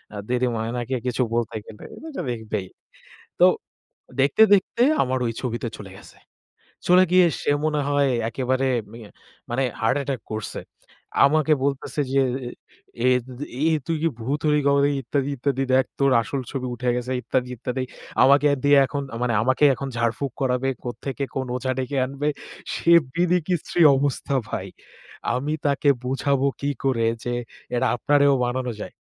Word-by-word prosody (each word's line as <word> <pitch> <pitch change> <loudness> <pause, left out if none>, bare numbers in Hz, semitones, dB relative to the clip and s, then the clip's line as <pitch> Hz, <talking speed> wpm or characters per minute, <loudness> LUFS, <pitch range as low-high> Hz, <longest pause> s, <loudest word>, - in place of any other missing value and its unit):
আ - - -5
দিদিমা 125 -2 0
এনাকে 120 +2 -3
কিছু 125 +1 0
বলতে 115 -1 -1
গেলে 105 - -12 0.2
এটা 310 - -5
দেখবেই। 110 -4 -4 0.7
তো - - +8 0.7
দেখতে, 140 +10 +4
দেখতে 200 +4 +1 0.2
আমার 130 0 0
ঐ - - 0
ছবিতে 120 -1 -3
চলে 100 -2 -9
গেছে। - - -16 0.7
চলে 180 +1 +7
গিয়ে 185 0 +6 0.2
সে - - +1
মনে 150 -1 +1
হয় 145 -1 +2 0.2
একেবারে 130 +2 0 0.2
মিয়ে 115 -2 -11 0.4
মানে 125 +3 0 0.2
হার্ট 115 +3 +2
অ্যাটাক 140 -2 -3
করছে। 110 0 -4 0.7
আমাকে 155 +2 +3
বলতেছে 140 +1 -1
যে 135 - +4 0.9
"এ - - +6 0.2
তু 130 - -12
তু - - -3 0.2
এ - - +4 0.2
তুই 165 - 0
কি 165 - +3
ভূত 135 +6 -2
হলি 150 0 +3
কবে 140 0 +4
নাকি? 145 - +2
ইত্যাদি, 140 +3 -1
ইত্যাদি 135 +1 0
দেখ 130 0 +4
তোর 140 -1 +3
আসল 135 +4 -4
ছবি 130 -3 -3
উঠে 125 +1 -1
গেছে 125 +1 -3
ইত্যাদি, 125 +1 -1
ইত্যাদি।" 125 +3 -3 0.4
আমাকে 140 +2 +5 0.2
দিয়ে 145 0 +6
এখন 140 +1 -3
আ - - -4
মানে 120 -1 +1
আমাকেই 130 +4 +4
এখন 140 - -5
ঝাড়ফুক 120 +4 -1
করাবে। 130 0 +1
কোত্থেকে 135 +3 -5
কোন 130 - -1
ওঝা 130 0 -2
ডেকে 130 +2 -2
আনবে। 140 +3 -2 0.4
সে 170 - +1 0.2
বিতিকিচ্ছিরি 175 0 +1
অবস্থা 140 0 -1
ভাই। - - -4 0.7
আমি 140 +4 -2
তাকে 145 0 +2 0.2
বুঝাবো 135 +1 +1
কি 140 - 0
করে 125 -4 +1 0.2
যে 120 - -2 0.4
এটা 125 +2 +2
আপনারেও 140 +3 +3
বানানো 125 0 -2
যায়? - - -7
135 Hz, 160 wpm, -23 LUFS, 125-145 Hz, 0.9 s, তো